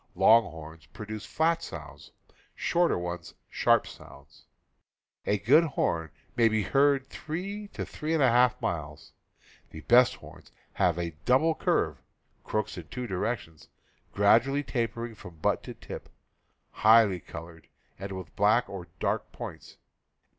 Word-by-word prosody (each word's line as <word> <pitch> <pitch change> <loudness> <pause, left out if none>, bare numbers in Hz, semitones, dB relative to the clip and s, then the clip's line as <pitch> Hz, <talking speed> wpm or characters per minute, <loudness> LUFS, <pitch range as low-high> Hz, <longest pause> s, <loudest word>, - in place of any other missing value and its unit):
Long 115 0 +6
horns 80 -1 -11
produce 110 0 -8
flat 165 +1 +1
sounds, - - -9 0.5
shorter 175 0 +1
ones 85 -1 -6 0.2
sharp - - +3
sounds. - - -14 0.8
A 105 - +2
good 135 - +5
horn 85 - -1 0.3
may 115 -1 +5
be 110 -1 +1
heard 135 +4 +2
three 195 +6 -6
to - - -6
three 155 +2 -3
and 150 - +2
a 130 - +5
half 125 0 +4
miles. 75 -3 -5 0.6
The 80 - -10
best 120 +5 +5
horns - - -15 0.2
have 85 -2 +1
a 85 -1 -3
double 135 +6 +4
curve - - 0 0.4
(crooks 105 -3 -3
in 80 - -11
two 125 -1 -5
directions), 95 -5 -4 0.4
gradually 120 +8 +3
tapering 115 -2 -3
from 90 -5 -12
butt 80 - 0
to - - -8
tip, - - -9 0.6
highly 110 -4 +5
colored, 80 +1 -11 0.3
or 100 - -4
with 95 -3 -8
black 105 +4 +3
or 90 -3 -8
dark - - -1
points. - - -9
110 Hz, 140 wpm, -28 LUFS, 90-135 Hz, 0.8 s, Long